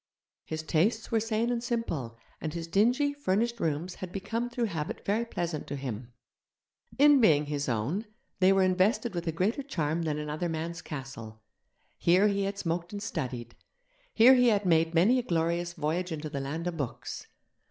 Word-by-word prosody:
His 160 0 -4
tastes 205 +9 +1
were 225 - +3
sane 225 +2 0
and 235 -1 -1
simple, 165 - -3 0.2
and 155 0 -4
his 165 -1 -3
dingy, 245 - +2
furnished 235 -3 0
rooms 165 +2 -1
had 185 -2 -5
become 225 +5 -3
through 240 0 -2
habit 165 -8 -3
very 215 +4 +1
pleasant 170 -8 -3
to - - -4
him. 125 -3 -6 0.9
In 290 -1 +6
being 150 -8 +5
his 145 -2 -2
own, 135 - -1 0.3
they 185 0 +5
were 195 0 +4
invested 195 +6 +2
with 170 -1 -4
a - - +2
greater 190 - 0
charm 165 - -1
than 155 -2 -1
another 150 +3 -3
man's 165 +1 -4
castle. 115 -7 -8 0.6
Here 185 +5 +4
he 200 -1 0
had 200 0 -3
smoked 170 -1 -2
and 205 -1 -5
studied, 125 - -4 0.6
here 235 +4 +7
he 250 -1 +5
had 210 -3 +3
made 165 -1 +3
many 215 +10 +5
a - - +1
glorious 170 -3 -1
voyage 175 +4 -2
into 155 -1 -4
the 140 - -3
land 155 +5 -4
of 175 -2 -3
books. 140 -6 -5
175 Hz, 180 wpm, -29 LUFS, 155-220 Hz, 0.9 s, here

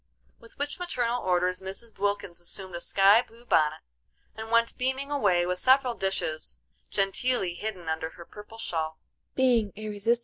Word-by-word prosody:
With 230 - -18
which 290 +4 -3
maternal 245 -9 -1
orders 180 0 +1
Mrs. 195 +4 -5
Wilkins 200 -4 -1
assumed 185 +1 -2
a 175 - -4
sky 195 +5 +5
blue 235 0 -17
bonnet, 155 -7 +2 0.5
and 220 0 -7
went 230 0 +3
beaming 265 +2 -2
away 195 -11 +2
with 180 0 -1
several 260 +2 +4
dishes 190 -7 -1 0.3
genteelly 195 0 +1
hidden 185 -2 -6
under 160 0 -2
her 170 +1 -12
purple 210 +4 -12
shawl. 160 -7 -2
200 Hz, 140 wpm, -28 LUFS, 175-235 Hz, 0.5 s, sky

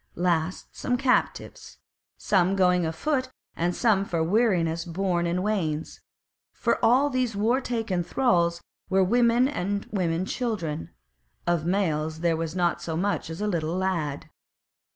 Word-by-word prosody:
Last 175 0 -1
came 250 -1 0
captives, 260 -1 -1 0.4
some 190 -1 +2
going 180 -3 +3
afoot 260 - -1 0.3
and 175 +1 -1
some 210 -5 +2
for 170 -4 -1
weariness 170 -4 +1
borne 175 0 -1
in 180 +2 -1
wains; 165 -8 -2 0.5
for - - -1
all 270 +5 +4
these 255 -4 0
war 230 +6 +2
taken 225 -8 -2
thralls 170 -7 +1 0.3
were 190 0 +3
women 235 +4 +3
and 200 -6 -2
women 180 -3 0
children; 185 - -3 0.6
of 170 -2 0
males 160 -4 0
there 170 -1 +2
was 165 +1 -4
not 175 -2 +1
so 160 -1 -3
much 180 -3 -1
as 165 +4 -6
a 210 - 0
little 170 -3 -1
lad. 170 -7 -2
180 Hz, 140 wpm, -26 LUFS, 165-215 Hz, 0.6 s, all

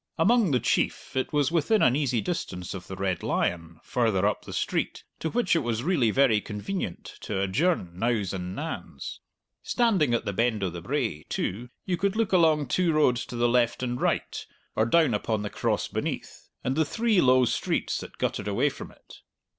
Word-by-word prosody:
Among 220 +4 +4
the 130 -4 +2
chief - - -1
it 130 - -1
was 145 -1 +2
within 175 +6 +2
an 125 0 +4
easy 130 -6 +1
distance 90 - -4
of 95 -2 -8
the 95 - -6
Red 95 -1 -1
Lion, 85 -2 -1
farther 110 -6 +1
up 105 - 0
the - - -8
street, - - -2 0.2
to 160 - -2
which 230 -5 +1
it - - +4
was 120 -3 -2
really 150 -9 +2
very 115 -3 +3
convenient 105 - -5
to 100 -3 -3
adjourn 100 - +1
nows 110 -4 0
and 90 0 -4
nans. 160 +6 -6 0.4
Standing 190 - +2
at - - -2
the 100 - -2
Bend 110 0 +1
o' 95 - -1
the 85 0 -7
Brae, 110 - -2
too, 120 +6 -3 0.2
you 180 -2 0
could 200 +2 0
look 225 -2 0
along 160 -4 +4
two 180 +4 +1
roads 125 -6 +2
to - - -7
the 120 0 +2
left 120 0 +2
and 125 0 -2
right, - - -1 0.3
or 110 - +2
down 160 -2 +4
upon 105 0 -1
the 105 - -4
Cross - - -1
beneath, - - -5
and 130 - 0
the 160 - +3
three 220 +5 +2
low 130 0 +5
streets - - -1
that - - -10
guttered - - -2
away - - +2
from - - -9
it. - - -17
125 Hz, 195 wpm, -27 LUFS, 105-165 Hz, 0.4 s, low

